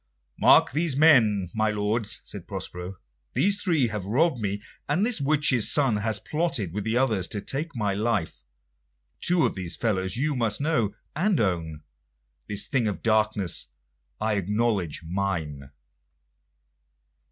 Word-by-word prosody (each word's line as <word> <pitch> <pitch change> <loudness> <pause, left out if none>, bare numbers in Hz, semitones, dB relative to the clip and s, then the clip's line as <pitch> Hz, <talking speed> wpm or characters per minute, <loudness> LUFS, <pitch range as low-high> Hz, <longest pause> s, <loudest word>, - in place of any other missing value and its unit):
"Mark - - +6
these 155 0 0
men, 115 - +5
my 110 0 +1
lords," 105 +1 -1
said 100 -4 -9
Prospero. 95 -1 -6 0.4
"These 200 +2 +2
three 165 -9 +2
have 105 -3 -4
robbed 130 - +1
me, 100 -1 -3 0.3
and 170 +8 +2
this 230 -10 +1
witch's 140 -5 +3
son 135 -7 +2
had 105 0 -2
plotted 150 - -1
with 105 +1 -3
the 115 +2 0
others 110 -8 +1
to 105 - -3
take 145 +9 -4
my 105 -4 0
life. 105 -4 -1 0.8
Two 175 -1 +3
of - - 0
these 90 -3 -5
fellows 95 -3 -1
you 145 +2 0
must 115 -4 0
know 120 -9 0 0.2
and 185 +4 +1
own; 80 -7 -1 0.6
this 105 -1 -3
thing 130 -6 +1
of 105 - -4
darkness 110 -4 0 0.5
I 110 -1 0
acknowledge 100 -4 -1
mine." 80 -6 -3
110 Hz, 140 wpm, -26 LUFS, 100-135 Hz, 0.8 s, Mark